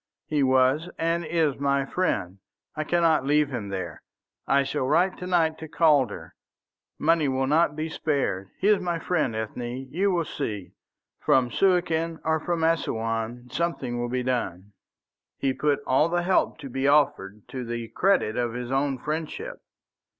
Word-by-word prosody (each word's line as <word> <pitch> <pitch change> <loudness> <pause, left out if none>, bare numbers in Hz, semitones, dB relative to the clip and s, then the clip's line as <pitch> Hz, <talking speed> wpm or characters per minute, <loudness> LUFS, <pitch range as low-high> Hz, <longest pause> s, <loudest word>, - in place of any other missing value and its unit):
"He 150 -3 0
was 130 +5 +3
and 165 +1 0
is 160 -4 0
my 140 -1 +1
friend; 100 - -1 0.4
I 155 - -1
cannot 165 -2 +2
leave 145 +1 +2
him 115 -7 -4
there. 95 -3 -5 0.5
I 140 0 +4
shall 140 -1 -2
write 175 +6 +3
to 180 - -5
night 165 -3 +2
to 160 - -7
Calder. 145 - +2 0.6
Money 160 -1 +2
will 135 0 0
not 150 +2 +2
be 155 +1 -2
spared. 140 -12 -1
He 195 - 0
is 210 -2 +4
my 175 -2 -1
friend, 155 -9 0
Ethne. 120 +4 -4
You 195 +5 +1
will 175 -3 +1
see. 105 -9 -5 0.5
From 125 -2 +2
Suakin 170 -1 +1
or 160 0 +2
from 170 +1 -2
Assouan 120 -6 -1
something 135 -7 -2
will 120 0 -2
be 125 +1 -1
done." 105 -6 -3 0.6
He 135 -1 0
put 145 +1 0
all 135 +5 +3
the 175 0 0
help 185 -2 +2
to 140 - -7
be 135 +2 0
offered 105 -9 +2
to 130 -1 -5
the 120 -1 -4
credit 185 - +2
of 120 -2 -1
his 125 0 -5
own 135 0 +1
friendship. 160 - -4
140 Hz, 165 wpm, -26 LUFS, 125-165 Hz, 0.6 s, I